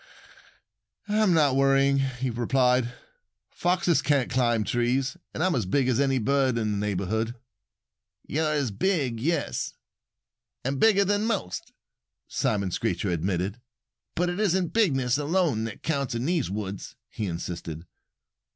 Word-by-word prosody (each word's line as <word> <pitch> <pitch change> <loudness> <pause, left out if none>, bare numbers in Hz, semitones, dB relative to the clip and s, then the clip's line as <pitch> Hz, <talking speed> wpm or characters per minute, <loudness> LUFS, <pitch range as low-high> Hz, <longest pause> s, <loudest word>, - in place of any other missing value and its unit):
"I'm 210 -2 +3
not 145 -4 +4
worrying," 135 0 +4
he 130 -1 -2
replied. 125 +1 +2 0.6
"Foxes 175 -1 +1
can't 140 -4 +1
climb 120 -3 +2
trees. 125 +5 0 0.2
And 160 - -2
I'm 185 -1 +2
as 115 -7 -1
big 135 +5 +2
as 130 -1 +2
any 135 -1 +2
bird 130 +1 +2
in 110 -2 0
the 105 - -1
neighborhood." 105 +3 -1 0.9
"You're 155 +1 0
as 140 -6 0
big 130 - 0
yes! 165 +8 -1 0.9
And 135 +1 -1
bigger 200 -3 +5
than 205 +2 +1
most!" 200 - -3 0.6
Simon 100 -3 0
Screecher 95 -2 -1
admitted. 95 +5 -2 0.5
"But 175 +1 +1
it 175 +2 -3
isn't 190 -4 +1
bigness 140 - +2
alone 150 -7 +1
that 115 - -7
counts 140 -6 -1
in 115 +2 -2
the 170 +1 +2
woods," 100 0 -5
he 105 - -4
insisted. 85 -1 -5
130 Hz, 135 wpm, -26 LUFS, 110-155 Hz, 0.9 s, bigger